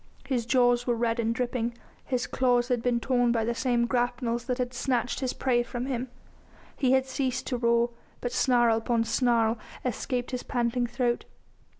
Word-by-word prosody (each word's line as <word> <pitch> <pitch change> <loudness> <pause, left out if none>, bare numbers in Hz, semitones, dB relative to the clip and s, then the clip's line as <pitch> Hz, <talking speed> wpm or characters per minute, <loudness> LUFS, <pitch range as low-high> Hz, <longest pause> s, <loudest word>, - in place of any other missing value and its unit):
His 250 -4 -1
jaws 245 -1 +3
were 240 - +2
red 230 0 0
and 230 0 +1
dripping, 240 -1 -2 0.3
his 250 -1 -1
claws 245 -1 +1
had 245 -2 +1
been 240 0 +1
torn 245 -1 +2
by 225 -2 +1
the 235 - 0
same 240 -1 +1
grapnels 240 -1 -1
that 250 - -1
had 250 -1 -2
snatched 245 -1 -1
his 260 -3 -1
prey 245 -2 +1
from 240 +1 -4
him. 260 -1 -3 0.7
He 260 -2 +2
had 265 0 +3
ceased 260 -1 -2
to 250 - -2
roar, 235 0 +2 0.3
but 245 - -3
snarl 240 -3 +3
upon 230 0 +1
snarl 230 -1 +2 0.3
escaped 245 +1 -2
his 250 -1 -2
panting 240 0 0
throat. 240 0 -1
245 Hz, 180 wpm, -28 LUFS, 235-250 Hz, 0.7 s, jaws